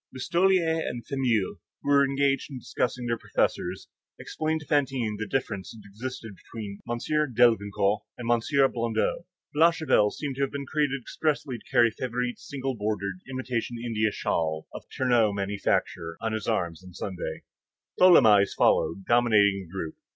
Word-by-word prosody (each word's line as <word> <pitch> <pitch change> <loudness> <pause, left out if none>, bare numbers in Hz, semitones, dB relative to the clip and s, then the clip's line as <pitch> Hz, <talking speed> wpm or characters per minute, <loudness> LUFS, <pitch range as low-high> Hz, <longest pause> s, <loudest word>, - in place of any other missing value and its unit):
Listolier 170 +4 +2
and 120 -6 -5
Fameuil, 120 -8 0 0.2
who - - -8
were 140 0 +6
engaged 140 +1 +1
in 135 - -7
discussing 125 0 -2
their 115 -1 -1
professors, - - -1 0.3
explained 160 0 -2
to - - -11
Fantine 135 -8 0
the 110 - -3
difference 100 -7 -3
that 105 -3 -13
existed 115 +1 -7
between 105 -1 -8
M. 120 - -1 0.4
Delvincourt 105 -3 +3 0.2
and 120 -1 -2
M. 135 +4 +3
Blondeau. 115 +7 -1 0.3
Blachevelle 155 -8 +4
seemed 140 +3 -5
to - - -2
have 135 - +1
been 140 -1 -5
created 145 -1 0
expressly 140 -1 -2
to - - -21
carry 120 -3 +5
Favourite's 125 +1 -4
single 135 -2 -3
bordered, 100 -4 -3
imitation 125 -2 -3
India 115 -2 0
shawl 80 -5 -2
of - - -8
Ternaux's 120 -5 +2
manufacture, 100 -4 -1
on 110 -1 -2
his 110 -2 -3
arm 85 -2 0
on 90 -1 -13
Sundays. 95 -3 -5 0.6
Tholomyès 110 - +6
followed, 95 +3 +2
dominating 105 -5 +3
the - - -18
group. 85 -4 -5
120 Hz, 150 wpm, -27 LUFS, 105-135 Hz, 0.6 s, were